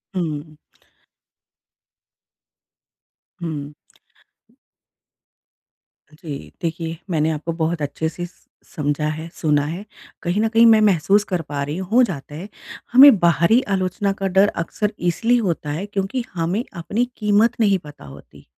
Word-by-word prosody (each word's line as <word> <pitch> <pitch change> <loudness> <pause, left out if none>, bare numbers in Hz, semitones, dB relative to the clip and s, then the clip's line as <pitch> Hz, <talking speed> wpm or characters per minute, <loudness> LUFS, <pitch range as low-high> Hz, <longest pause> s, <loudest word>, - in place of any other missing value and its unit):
हुँ। 155 -3 -4 2.8
हुँ। 150 -3 -5 2.4
जी। 150 -2 -8
देखिए, 165 -1 -3
मैंने 160 -2 +1
आपको 160 +2 -3
बहुत 160 0 -1
अच्छे 145 +2 -2
से 175 +2 -6
स 175 - -17 0.3
समझा 145 0 -1
है, 155 +1 -5
सुना 150 -3 +1
है, 170 +7 -5 0.4
कहीं 180 +5 0
न 225 - +2
कहीं 230 +1 +5
मैं 225 -1 +7
महसूस 200 0 +3
कर 180 -3 -1
पा 145 -2 -5
रही 145 +3 -4
हूँ 185 -1 -6
हो 245 +3 +6
जाता 145 - -4
है। 175 +6 -7 0.4
हमें 265 -1 +9
बाहरी 170 +7 +4
आलोचना 185 +2 -1
का 195 - 0
डर 190 +2 +4
अक्सर 200 +5 -2
इसलिए 225 +8 +1
होता 170 -8 -2
है 160 +7 -3
क्योंकि 205 +4 -3
हमें 180 +6 -1
अपनी 205 +8 -1
कीमत 210 +2 +3
नहीं 200 -4 +3
पता 145 - -12
होती, 70 - -14
175 Hz, 135 wpm, -21 LUFS, 155-205 Hz, 2.8 s, हमें